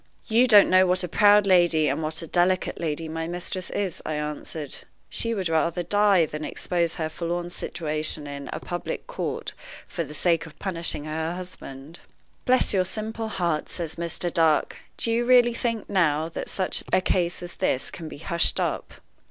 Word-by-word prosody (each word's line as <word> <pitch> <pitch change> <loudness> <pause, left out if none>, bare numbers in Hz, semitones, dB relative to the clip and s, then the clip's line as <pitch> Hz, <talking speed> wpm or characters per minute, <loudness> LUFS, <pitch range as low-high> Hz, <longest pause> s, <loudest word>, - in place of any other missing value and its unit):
"You 235 +3 +4
don't 210 -4 +8
know 185 0 +6
what 180 +1 +2
a - - -1
proud 205 +3 +5
lady 175 -5 +4
and 145 +3 0
what 155 +2 -2
a - - -5
delicate 180 +3 +1
lady 160 -1 -2
my 160 +1 -4
mistress 175 +1 -4
is," 195 -5 -2
I 155 - -3
answered. 150 0 -5 0.3
"She 230 0 -2
would 190 -3 -2
die 165 - 0
rather 170 +2 +1 0.4
than 150 0 -6
expose 170 +1 -1
her 160 - -2
forlorn 175 +2 -3
situation 155 -2 -2
in 140 -1 -7
a - - -4
public 175 -1 -5
court - - -4 0.3
for 170 - -3
the 150 0 -9
sake 165 +1 +1
of 155 0 -15
punishing 170 -5 -3
her 160 +2 -3
husband." 165 -4 -9 0.5
"Bless 255 -3 +4
your 190 -2 +3
simple 220 +3 -4
heart!" 175 -7 -1
says 165 -3 -4
Mr. 170 +1 -3
Dark, 160 -2 +2 0.2
"do 230 - 0
you 235 +1 +2
really 240 -1 +5
think, 230 -2 -2
now, 160 -5 +2
that - - -6
such 185 -1 -1
a - - +5
case 180 -1 0
as 175 - -7
this 130 - 0
can 165 - -7
be - - -9
hushed 170 +3 +1
up?" - - -2
170 Hz, 185 wpm, -25 LUFS, 155-185 Hz, 0.5 s, don't